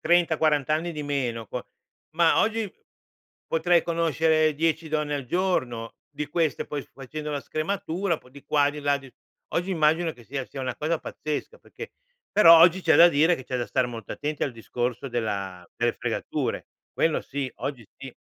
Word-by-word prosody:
30, 170 -1 +3
40 150 -3 +2
anni 165 +3 +1
di 150 -1 -5
meno, 125 -6 -2
qua - - -5 0.5
ma 170 -1 +5
oggi 220 -3 0 0.7
potrei 170 +1 +3
conoscere 160 -2 +2
10 160 +1 0
donne 150 -1 -1
al 140 -2 -3
giorno. 130 -10 -1 0.2
Di 145 0 -4
queste, 160 -2 0
poi, 145 - -3
facendo 150 +3 -6
la 145 - -2
scrematura, 180 +3 -2
un - - -7
po' 125 - -20
di 140 +1 -14
qua, 145 -1 +3
di 150 - -8
là, 145 0 +2
di 135 -2 -14 0.4
oggi, 180 +3 0
immagino 160 0 +2
che 120 - -16
sia 135 +1 -4
sia 135 - -8
una 130 -1 -3
cosa 160 +2 0
pazzesca, 155 - -5
perché 460 -1 -10 0.4
però 170 -5 +9
oggi 180 +2 +6
c'è 160 - +4
da 170 - +9
dire 160 +2 +4
che 130 - -9
c'è 130 - -3
da 120 - -2
stare 130 -2 +1
molto 115 -3 -7
attenti 150 0 -2
al 135 - -3
discorso 120 +3 -3
della 100 -7 -3
delle - - +1
fregature. - - -3 0.2
Quello 160 -1 +1
sì, 140 -1 -4
oggi 130 -6 -5
sì. 135 -2 -10
150 Hz, 185 wpm, -26 LUFS, 135-165 Hz, 0.7 s, però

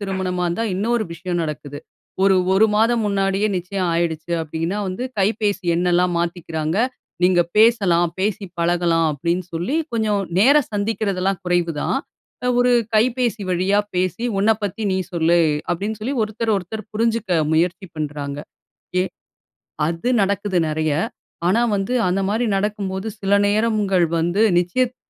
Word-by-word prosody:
திருமணமா 190 -2 -2
இருந்தா 175 +7 -1
இன்னொரு 220 +3 0
விஷயம் 175 +1 -3
நடக்குது. 150 -2 -5 0.4
ஒரு, 195 -1 +5 0.2
1 220 +3 +5
மாதம் 230 +1 +3
முன்னாடியே 195 +1 +1
நிச்சயம் 180 +1 -2
ஆயிடுச்சு 165 0 -1
அப்டின்னா, 165 +6 -3
வந்து 185 +7 -4
கைபேசி 205 -1 0
எண்ணெல்லாம் 180 +1 +2
மாத்திக்கிறாங்க. 165 -1 -2 0.5
"நீங்க 180 -1 +4 0.2
பேசலாம் 195 -7 +4
பேசி 205 +1 -1 0.2
பழகலாம்" 170 -1 +2
அப்டின்னு 170 +5 -2
சொல்லி 180 - -1 0.2
கொஞ்சம் 215 -3 +1 0.2
நேர 270 +9 +6 0.2
சந்திக்கிறதெல்லாம் 200 -3 -1
குறைவு 175 -2 +1
தான். - - 0 0.6
ஒரு 250 0 +3 0.2
கைபேசி 235 -1 +1
வழியா 185 +3 +2 0.2
பேசி 185 +6 -1 0.2
"உன்னப் 220 +1 +2
பத்தி 205 +2 -3
நீ - - +1 0.2
சொல்லு" 170 0 +3 0.3
அப்டின்னு 205 +5 -3
சொல்லி 260 +6 -2
ஒருத்தர், 220 0 -1
ஒருத்தர் 195 +3 -5
புரிஞ்சுக்க 220 -6 +1
முயற்சி 180 +4 +1
பண்றாங்க. 145 -2 -4 0.6
ஏ - - +3 0.9
அது 170 +8 -2
நடக்குது 200 -1 0
நிறைய. 155 0 0 0.6
ஆனா 230 +6 +3
வந்து 195 +6 -2
அந்த 195 +2 0
மாரி 230 +3 0
நடக்கும்போது 195 -1 -2
சில 195 0 -1 0.2
நேரங்கள் 205 -4 +2
வந்து 175 +6 +1 0.2
நிச்சயித்த 245 +9 0
190 Hz, 130 wpm, -21 LUFS, 175-215 Hz, 0.9 s, நேர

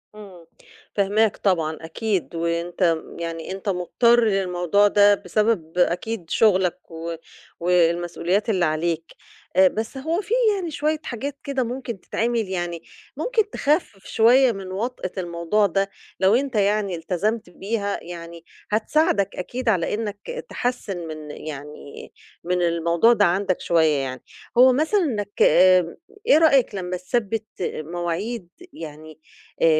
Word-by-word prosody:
إمم. 190 -6 -13 0.5
فاهماك 205 +2 +2
طبعًا 160 -5 0
أكيد، 185 +2 -2
وأنت 170 +1 0 0.2
يعني 165 0 -5
أنت 195 +1 -4
مضطر 235 +6 +3
للموضوع 195 -1 +2
ده 205 0 +5
بسبب 185 -4 -1
أكيد 180 +1 0
شُغلك 190 -7 +2
و 165 +1 -5 0.4
والمسئوليّات 175 +3 +1
اللي 185 -5 +2
عليك. 165 +1 -1 0.4
آآ 190 0 +7
بس 220 +7 -4
هو 320 +7 -1
في 415 - -4 0.2
يعني 350 -4 -4
شوية 305 +1 -1
حاجات 275 +3 -5
كده 275 -2 -1
ممكن 240 -3 -5
تتعمل 230 -2 -1
يعني 175 -2 -3 0.3
ممكن 445 -4 0
تخفِّف 285 - -1
شوية 245 +3 +5
من 195 -3 -7
وطْأة 210 -1 -3
الموضوع 175 +3 0
ده 195 +1 0 0.3
لو 190 +3 +4
أنت 265 -1 -1
يعني 205 -2 +1
التزمت 185 +5 -2
بيها 200 +2 -3
يعني 170 -1 -9 0.3
هتساعدك 215 - +1
أكيد 240 +6 -3
على 185 -4 +1
إنّك 215 - -5
تحسِّن 245 -6 -3
من 155 -1 -7
يعني 150 -1 -9 0.3
من 180 +1 0
الموضوع 170 +6 +3
ده 210 -3 +3
عندك 185 +1 0
شوية 160 -3 +3
يعني. 130 -1 -4 0.3
هو 255 +1 +7
مثلًا 315 +9 +2
إنّك 205 - -3
آآ 185 -2 +5 0.3
إيه 465 - +7
رأيك 275 -9 +4
لما 180 -1 -3
تثبّت 215 +3 -2 0.2
مواعيد 175 +6 -3 0.2
يعني 155 0 -10 0.4
آآ - - +5
195 Hz, 130 wpm, -23 LUFS, 170-230 Hz, 0.5 s, آآ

